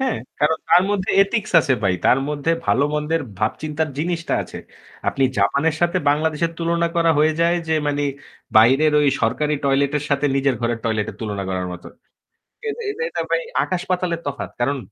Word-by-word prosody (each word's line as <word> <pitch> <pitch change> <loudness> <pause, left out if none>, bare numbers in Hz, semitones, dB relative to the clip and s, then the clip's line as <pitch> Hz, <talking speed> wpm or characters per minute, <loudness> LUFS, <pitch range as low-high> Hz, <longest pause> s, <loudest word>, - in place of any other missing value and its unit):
হ্যাঁ, 265 -2 0 0.2
কারণ 155 +2 +3
তার 175 +2 +6
মধ্যে 200 -2 -1
এথিক্স 215 +1 -2
আছে 145 - 0
ভাই। 95 -2 +2
তার 125 - +5
মধ্যে 150 +2 -1
ভালোমন্দের 150 +8 +1 0.2
ভাব 110 +1 +1
চিন্তার 155 +1 -2
জিনিসটা 170 +1 -1
আছে। - - -9 0.5
আপনি 135 - +1
জাপানের 140 +11 +2
সাথে 175 +1 +2
বাংলাদেশের 160 +2 0
তুলনা 170 0 0
করা 165 -1 +4
হয়ে 155 +1 +4
যায় 170 +1 +3
যে 160 - +2
মানি 145 0 0 0.5
বাইরের 135 +8 +5
ওই 145 - +3
সরকারি 150 +6 +1
টয়লেট 140 +1 +2
এর 145 - -6
সাথে 140 +1 +2
নিজের 135 -1 +2
ঘরের 120 -1 -1
টয়লেট 110 -2 0
এর - - -15
তুলনা 105 -3 -3
করার 95 -1 -2
মত। 90 0 -10 0.8
এটা 435 - -4
এটা 420 +3 -5
এটা - - -2
ভাই - - +1 0.2
আকাশ-পাতালের 180 -2 -2
তফাৎ। 140 -1 -4
কারণ 140 +4 +1
150 Hz, 175 wpm, -21 LUFS, 135-170 Hz, 0.8 s, তার